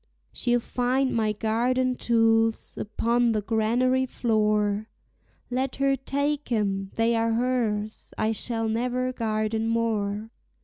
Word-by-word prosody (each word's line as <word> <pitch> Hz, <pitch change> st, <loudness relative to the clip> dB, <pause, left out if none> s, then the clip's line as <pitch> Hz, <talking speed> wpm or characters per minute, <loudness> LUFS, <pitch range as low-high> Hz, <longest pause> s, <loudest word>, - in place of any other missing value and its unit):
She'll 245 Hz, 0 st, +1 dB
find 255 Hz, +3 st, 0 dB
my 220 Hz, -2 st, +1 dB
garden 245 Hz, +4 st, 0 dB
tools 225 Hz, -1 st, +2 dB
upon 235 Hz, +2 st, +1 dB
the 215 Hz, -, 0 dB
granary 245 Hz, +4 st, +1 dB
floor. 215 Hz, -3 st, +1 dB, 0.6 s
Let 255 Hz, +1 st, -1 dB
her 275 Hz, 0 st, +2 dB
take 285 Hz, +1 st, -2 dB
'em 195 Hz, -3 st, 0 dB
they 230 Hz, +1 st, +2 dB
are 225 Hz, 0 st, +1 dB
hers; 225 Hz, -3 st, -1 dB
I 215 Hz, 0 st, +1 dB
shall 225 Hz, +1 st, -1 dB
never 250 Hz, +3 st, -1 dB
garden 220 Hz, -1 st, -1 dB
more. 220 Hz, -2 st, -1 dB
230 Hz, 120 wpm, -26 LUFS, 215-250 Hz, 0.6 s, tools